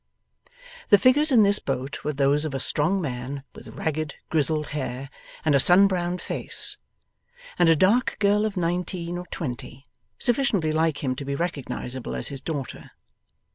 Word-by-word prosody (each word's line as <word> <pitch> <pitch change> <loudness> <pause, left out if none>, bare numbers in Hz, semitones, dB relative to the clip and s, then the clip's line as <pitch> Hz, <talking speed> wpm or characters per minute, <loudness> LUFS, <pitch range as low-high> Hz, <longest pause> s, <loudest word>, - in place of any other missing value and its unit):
The 205 - +7
figures 270 +8 +3
in 230 -5 +6
this 200 +1 +5
boat 135 0 -4
were 150 - -1
those 140 +2 +2
of 150 -3 -4
a - - -2
strong 155 +8 +2
man 135 -1 -5
with - - -13
ragged 155 -5 -4 0.2
grizzled 155 -1 +1
hair 135 -1 -5 0.3
and 155 - +3
a 140 - +5
sun 180 +8 +6
browned 180 -2 -1
face, - - +2 0.8
and 175 -2 +5
a 165 - +6
dark 205 +10 +2
girl 205 0 +2
of 215 -2 -3
nineteen 175 0 -2
or 180 - -9
twenty, 135 -3 -7 0.3
sufficiently 230 - +1
like 160 -2 0
him 130 -2 0
to 140 - -5
be 140 0 -3
recognizable 140 -5 -4
as - - -3
his 140 -2 -7
daughter. 145 -3 -6
160 Hz, 165 wpm, -24 LUFS, 140-190 Hz, 0.8 s, The